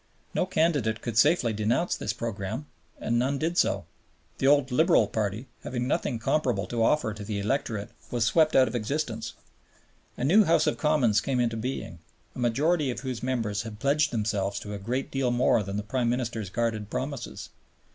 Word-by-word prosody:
No -, -, +1 dB
candidate 145 Hz, -, +1 dB
could 120 Hz, -3 st, -3 dB
safely 120 Hz, -1 st, +4 dB
denounce 115 Hz, +11 st, +1 dB
this -, -, -2 dB
program, 110 Hz, +4 st, -4 dB, 0.3 s
and 120 Hz, +1 st, 0 dB
none 135 Hz, +3 st, +1 dB
did 165 Hz, +4 st, -1 dB
so. -, -, +1 dB, 0.5 s
The 135 Hz, -, +2 dB
old 140 Hz, -2 st, +4 dB
Liberal 160 Hz, -, +4 dB
Party, 105 Hz, +3 st, -2 dB, 0.2 s
having 125 Hz, 0 st, -3 dB
nothing 130 Hz, -2 st, 0 dB
comparable 115 Hz, -4 st, 0 dB
to 120 Hz, -1 st, -2 dB
offer 115 Hz, -2 st, +2 dB
to 105 Hz, 0 st, -8 dB
the 105 Hz, 0 st, -3 dB
electorate, 105 Hz, -1 st, -2 dB, 0.2 s
was 120 Hz, -2 st, 0 dB
swept 155 Hz, +7 st, +3 dB
out 130 Hz, -1 st, +6 dB
of 110 Hz, -, -5 dB
existence. 115 Hz, -2 st, -2 dB, 0.8 s
A -, -, -3 dB
new 190 Hz, +11 st, +6 dB
House 165 Hz, -, +3 dB
of -, -, 0 dB
Commons 130 Hz, -9 st, +3 dB
came 130 Hz, -2 st, -1 dB
into 115 Hz, -2 st, +1 dB
being, 110 Hz, -7 st, -4 dB, 0.4 s
a -, -, -7 dB
majority 145 Hz, +6 st, +2 dB
of 125 Hz, -, -4 dB
whose 130 Hz, -3 st, -4 dB
members 115 Hz, -5 st, -1 dB
had 110 Hz, -2 st, -8 dB
pledged 150 Hz, +4 st, +2 dB
themselves 105 Hz, -3 st, -1 dB
to 105 Hz, -, -6 dB
a 100 Hz, -, -5 dB
great 125 Hz, +7 st, -3 dB
deal 135 Hz, -2 st, 0 dB
more 120 Hz, -2 st, +3 dB
than 100 Hz, 0 st, -4 dB
the 105 Hz, -, -2 dB
Prime 120 Hz, +3 st, 0 dB
Minister's 120 Hz, -5 st, -2 dB
guarded 110 Hz, -1 st, -2 dB
promises. 135 Hz, 0 st, -5 dB
120 Hz, 185 wpm, -27 LUFS, 110-140 Hz, 0.8 s, out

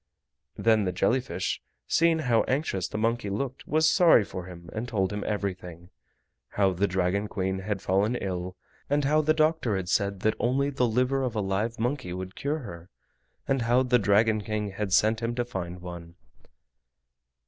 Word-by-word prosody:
Then 110 Hz, -2 st, +3 dB
the 90 Hz, -, 0 dB
jelly 125 Hz, +7 st, +2 dB
fish, 130 Hz, -, -3 dB, 0.3 s
seeing 165 Hz, 0 st, +3 dB
how 115 Hz, -2 st, +4 dB
anxious 130 Hz, -, -1 dB
the -, -, -5 dB
monkey 115 Hz, -1 st, 0 dB
looked, 130 Hz, +6 st, -4 dB
was 155 Hz, +2 st, +3 dB
sorry 170 Hz, -, +6 dB
for 95 Hz, -2 st, -7 dB
him, 85 Hz, -2 st, -11 dB
and 115 Hz, +2 st, -4 dB
told 95 Hz, -4 st, -1 dB
him 105 Hz, -, -3 dB
everything. 90 Hz, -4 st, -4 dB, 0.6 s
How 100 Hz, -2 st, +2 dB
the 100 Hz, +3 st, +1 dB
Dragon 95 Hz, +2 st, 0 dB
Queen 95 Hz, -1 st, -2 dB
had 95 Hz, 0 st, -4 dB
fallen 100 Hz, +6 st, +1 dB
ill, 90 Hz, -4 st, -4 dB, 0.3 s
and 145 Hz, 0 st, +1 dB
how 155 Hz, +2 st, +3 dB
the 155 Hz, +1 st, +2 dB
doctor 155 Hz, -8 st, +2 dB
had 95 Hz, -2 st, -3 dB
said 100 Hz, -1 st, 0 dB
that 110 Hz, -, +2 dB
only 135 Hz, +4 st, +1 dB
the 125 Hz, -3 st, +1 dB
liver 125 Hz, +4 st, +1 dB
of 125 Hz, -3 st, -2 dB
a -, -, 0 dB
live 105 Hz, +4 st, -1 dB
monkey 120 Hz, -6 st, -2 dB
would 95 Hz, +1 st, -6 dB
cure 150 Hz, +2 st, -2 dB
her, 85 Hz, -6 st, -10 dB, 0.6 s
and 135 Hz, -2 st, +1 dB
how 120 Hz, +2 st, +3 dB
the 125 Hz, -1 st, +3 dB
Dragon 110 Hz, +2 st, +3 dB
King 105 Hz, -1 st, -3 dB
had 95 Hz, 0 st, -4 dB
sent 110 Hz, +4 st, +3 dB
him 115 Hz, +1 st, -2 dB
to 120 Hz, 0 st, -1 dB
find 90 Hz, -6 st, -6 dB
one. 85 Hz, -1 st, -9 dB
105 Hz, 180 wpm, -27 LUFS, 95-125 Hz, 0.6 s, sorry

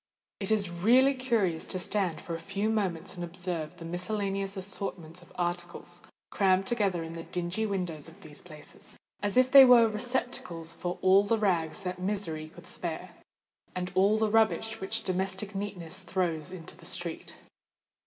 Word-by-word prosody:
It 195 Hz, -, -3 dB
is 205 Hz, -5 st, +2 dB
really 240 Hz, +10 st, +5 dB
curious 230 Hz, -11 st, 0 dB
to -, -, -2 dB
stand 185 Hz, -3 st, 0 dB
for 170 Hz, -, -6 dB
a 165 Hz, -, -3 dB
few 195 Hz, +5 st, -1 dB
moments 190 Hz, -5 st, -1 dB
and 175 Hz, -2 st, -6 dB
observe 175 Hz, -2 st, -4 dB
the 165 Hz, -, -9 dB
miscellaneous 195 Hz, +2 st, -2 dB
assortment 185 Hz, -3 st, -5 dB
of 175 Hz, -, -18 dB
articles 175 Hz, 0 st, -3 dB, 0.3 s
crammed 190 Hz, -1 st, +3 dB
together 195 Hz, -6 st, 0 dB
in 165 Hz, 0 st, -7 dB
the 165 Hz, -, -6 dB
dingy 180 Hz, +6 st, -2 dB
windows 175 Hz, -6 st, -3 dB
of 165 Hz, +5 st, -17 dB
these 150 Hz, -3 st, -11 dB
places,—as 180 Hz, +6 st, -7 dB
if 255 Hz, 0 st, +5 dB
they 275 Hz, -1 st, +11 dB
were 245 Hz, -3 st, +8 dB
receptacles 210 Hz, -7 st, -2 dB
for 175 Hz, +1 st, -4 dB
all 190 Hz, +1 st, +7 dB
the 225 Hz, +3 st, +1 dB
rags 185 Hz, -3 st, 0 dB
that 180 Hz, 0 st, -4 dB
misery 180 Hz, -5 st, -2 dB
could 170 Hz, +2 st, -14 dB
spare, 180 Hz, 0 st, -3 dB, 0.6 s
and 180 Hz, 0 st, -3 dB
all 195 Hz, +3 st, +4 dB
the 220 Hz, -1 st, +1 dB
rubbish 225 Hz, -1 st, +2 dB
which 220 Hz, +4 st, -2 dB
domestic 190 Hz, +2 st, -2 dB
neatness 190 Hz, -3 st, -5 dB
throws 175 Hz, -3 st, -2 dB
into 165 Hz, -4 st, -8 dB
the 170 Hz, 0 st, -15 dB
street. 170 Hz, -1 st, -3 dB
185 Hz, 165 wpm, -29 LUFS, 170-205 Hz, 0.6 s, they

